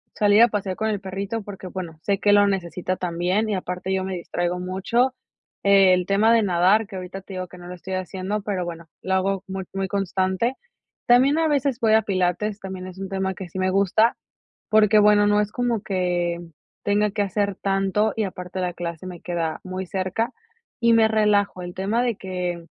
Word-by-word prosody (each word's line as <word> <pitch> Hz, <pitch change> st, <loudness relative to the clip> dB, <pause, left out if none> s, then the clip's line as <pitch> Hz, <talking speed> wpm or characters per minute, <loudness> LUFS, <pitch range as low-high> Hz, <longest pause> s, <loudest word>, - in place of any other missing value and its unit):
salir 205 Hz, +1 st, +5 dB
a 235 Hz, -, +7 dB
pasear 200 Hz, -4 st, -3 dB
con 220 Hz, -, -1 dB
el 210 Hz, -2 st, -1 dB
perrito, 195 Hz, +3 st, -4 dB
porque, 195 Hz, -2 st, -9 dB
bueno, 175 Hz, -4 st, -7 dB
sé 200 Hz, 0 st, 0 dB
que 205 Hz, 0 st, +3 dB
lo 205 Hz, 0 st, +6 dB
necesita 185 Hz, -1 st, -2 dB
también 180 Hz, +5 st, 0 dB
y 210 Hz, -, 0 dB
aparte 180 Hz, 0 st, -3 dB
yo 190 Hz, 0 st, -1 dB
me 190 Hz, 0 st, -3 dB
distraigo 175 Hz, 0 st, -2 dB
mucho. 200 Hz, +8 st, 0 dB, 0.5 s
El 190 Hz, -2 st, +5 dB
tema 210 Hz, +3 st, +4 dB
de 230 Hz, -1 st, +4 dB
nadar, 190 Hz, +3 st, +3 dB
que 195 Hz, -, -9 dB
ahorita 185 Hz, +1 st, -6 dB
te 190 Hz, 0 st, -10 dB
digo 185 Hz, 0 st, -4 dB
que 180 Hz, -, -13 dB
no 175 Hz, -, -11 dB
lo 180 Hz, -, -6 dB
estoy 190 Hz, +1 st, -6 dB
haciendo, 190 Hz, +2 st, -3 dB
pero, 195 Hz, -3 st, -2 dB
bueno, 170 Hz, -1 st, -7 dB, 0.2 s
lo 190 Hz, -, -1 dB
hago 190 Hz, 0 st, 0 dB
muy 190 Hz, 0 st, -4 dB
muy 195 Hz, 0 st, -2 dB
constante. 195 Hz, +3 st, 0 dB, 0.5 s
También 260 Hz, +5 st, +5 dB
a 325 Hz, -1 st, +2 dB
veces 280 Hz, -4 st, +1 dB
voy 220 Hz, -1 st, +4 dB
a 220 Hz, -, +5 dB
pilates, 195 Hz, +2 st, -1 dB
también 190 Hz, -1 st, -6 dB
es 185 Hz, 0 st, -10 dB
un 195 Hz, 0 st, -5 dB
tema 190 Hz, -1 st, -2 dB
que 190 Hz, -2 st, -8 dB
sí 180 Hz, -, -7 dB
me 185 Hz, 0 st, +1 dB
gusta, 200 Hz, +4 st, +3 dB, 0.5 s
porque 215 Hz, -1 st, +5 dB
bueno, 210 Hz, 0 st, +5 dB
no 210 Hz, 0 st, +4 dB
es 210 Hz, 0 st, -2 dB
como 240 Hz, -3 st, -1 dB
que 180 Hz, -3 st, -1 dB, 0.4 s
tenga 205 Hz, +1 st, +2 dB
que 205 Hz, +1 st, -1 dB
hacer 200 Hz, 0 st, -1 dB
tanto, 195 Hz, +2 st, 0 dB
y 220 Hz, -, 0 dB
aparte 185 Hz, -1 st, -5 dB
la 180 Hz, -1 st, -1 dB
clase 170 Hz, 0 st, -6 dB
me 180 Hz, -2 st, -8 dB
queda 170 Hz, -2 st, -2 dB
muy 185 Hz, 0 st, -5 dB
cerca, 190 Hz, +4 st, -2 dB, 0.5 s
y 235 Hz, -1 st, +4 dB
me 225 Hz, -1 st, +5 dB
relajo. 210 Hz, -3 st, +2 dB
El 175 Hz, 0 st, -6 dB
tema 205 Hz, +6 st, 0 dB
de 240 Hz, -4 st, 0 dB
que, 180 Hz, -3 st, -4 dB
195 Hz, 205 wpm, -23 LUFS, 185-210 Hz, 0.5 s, a